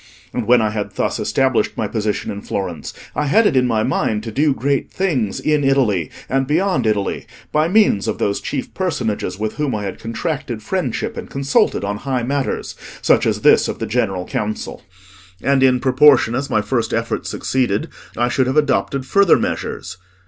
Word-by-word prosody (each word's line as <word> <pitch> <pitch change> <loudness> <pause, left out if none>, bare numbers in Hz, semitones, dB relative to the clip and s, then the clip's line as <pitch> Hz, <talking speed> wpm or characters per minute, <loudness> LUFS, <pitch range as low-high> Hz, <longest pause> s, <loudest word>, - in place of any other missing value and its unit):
And - - -3
when 120 -1 +5
I 110 - 0
had 105 -1 -4
thus - - -1
established 130 -5 +1
my 110 - -1
position 105 -1 -2
in 100 - -6
Florence, 90 -6 -4 0.2
I 150 - 0
had 215 +10 +4
it 205 - +3
in 125 -1 +3
my 110 -2 +1
mind 105 -1 0
to 115 - -5
do 145 +6 +2
great 140 0 -1
things 135 - -1
in 150 -1 +1
Italy 120 - +2 0.2
and 135 0 0
beyond 155 - +1
Italy, 105 -2 -1 0.2
by 155 +1 +2
means 190 - +3
of - - -1
those 100 0 -1
chief 135 -3 -4
personages 115 - -2
with 110 +1 -3
whom 150 -5 -1
I 105 - -3
had 95 - -5
contracted 120 -1 -4
friendship 165 - -2
and - - -6
consulted 135 -5 +1
on 100 +1 -2
high 130 +1 -2
matters, 135 +2 -2 0.3
such - - +4
as - - 0
this - - +5
of - - -4
the - - -3
General 100 -6 -1
Council. 105 0 -4 0.6
And 140 -1 +2
in 130 -1 +4
proportion 130 -2 +5
as 130 +3 -2
my 110 - +1
first 115 +1 -1
efforts 115 0 -2
succeeded, 125 -6 -1 0.3
I 120 +1 +2
should 125 +1 +1
have 130 +3 0
adopted 140 -2 +1
further 200 +6 +4
measures. 95 - -4
125 Hz, 185 wpm, -19 LUFS, 110-140 Hz, 0.6 s, when